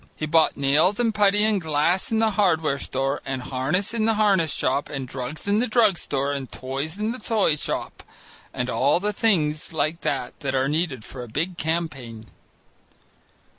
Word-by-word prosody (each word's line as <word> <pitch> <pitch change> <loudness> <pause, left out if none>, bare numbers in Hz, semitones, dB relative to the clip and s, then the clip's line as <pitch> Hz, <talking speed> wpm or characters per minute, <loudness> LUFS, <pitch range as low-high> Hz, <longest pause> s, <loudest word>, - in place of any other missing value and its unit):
He 155 - -3
bought 160 +1 +3
nails 150 - +3
and 230 -2 +2
putty 205 0 +3
and 215 -3 +2
glass 160 +5 +1
in 225 - +2
the 220 0 +3
hardware 160 -8 +1
store, 135 +2 -2
and 135 -1 -3
harness 140 - -1
in 225 -2 0
the 225 0 +2
harness 195 -7 +3
shop, 135 +3 0
and 135 -3 -5
drugs 130 +7 -6
in 205 +1 +3
the 245 - +1
drug 220 -4 +4
store 140 -3 -2
and 135 -2 -5
toys 135 +6 -4
in 215 +2 -1
the 250 - -6
toy 215 -11 +1
shop, - - -4 0.5
and 125 - -3
all 140 +5 +2
the 210 +2 -1
things 160 -8 0
like 155 +2 -1
that 130 -3 -3
that 135 -2 -2
are 130 +1 +2
needed 150 -6 -1
for 130 - -7
a 120 - -7
big 165 +10 -2
campaign. 140 -10 -3
155 Hz, 185 wpm, -24 LUFS, 135-200 Hz, 0.5 s, drug